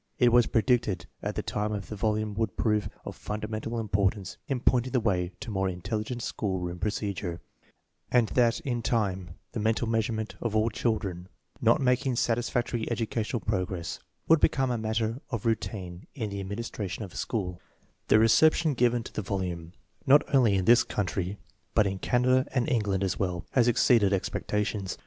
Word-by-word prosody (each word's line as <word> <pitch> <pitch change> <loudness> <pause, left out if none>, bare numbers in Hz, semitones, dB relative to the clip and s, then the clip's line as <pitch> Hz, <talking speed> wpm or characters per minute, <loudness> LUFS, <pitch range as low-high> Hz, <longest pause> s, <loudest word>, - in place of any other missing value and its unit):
It 125 -4 +4
was 120 -2 +6
predicted 115 -5 +1 0.2
at - - -3
the - - -2
time 105 +1 -2
that 100 -1 -3
the 105 - -7
volume 110 0 0
would 110 -1 -2
prove 105 -2 +1 0.2
of - - -6
fundamental 110 +2 -4
importance 100 -2 -1
in 135 -2 -1
pointing 125 +1 +2
the 125 - +4
way 90 -5 0
to 115 - -5
more 95 -1 0
intelligent 105 +6 -4
school 95 -3 -2
room 90 -1 -4
procedure, 100 -3 -2 0.7
and 120 -3 +3
that 120 +4 +2
in 125 -7 -2
time 105 -6 -1 0.2
the - - -4
mental 110 +2 +1
measurement 110 -1 -1
of 115 -2 -2
all 110 +1 +2
children 100 -6 -2 0.3
not - - +4
maln'rig 125 -1 +1
satisfactory 120 0 0
educational 115 0 -2
progress 90 -4 -2 0.3
would 165 -1 +6
become 135 -3 +2
a 120 - 0
matter 110 +3 -1
of 115 -6 -4
rou 115 - +5
tine 95 -5 -7
in 110 -7 -3
the 100 - -4
administration 100 0 -4
of 95 - -9
a - - -14
school 90 -6 -3 0.5
The - - +6
reception 155 +8 +4
given 120 -1 +2
to - - -10
the - - -2
volume, 90 -3 -4 0.3
not 145 +2 +7
only 120 -7 +5
in 95 -1 0
this 120 +1 +6
country 95 -1 -2 0.4
but 105 - +5
in 95 -1 -2
Canada 130 +3 +2
and 125 +1 +2
England 105 -8 +1
as 95 - -1
well, 90 -2 -2
has 125 -3 +3
ex 120 - +3
ceeded 105 -6 +4
expectations. 100 0 -2
110 Hz, 175 wpm, -28 LUFS, 95-120 Hz, 0.7 s, not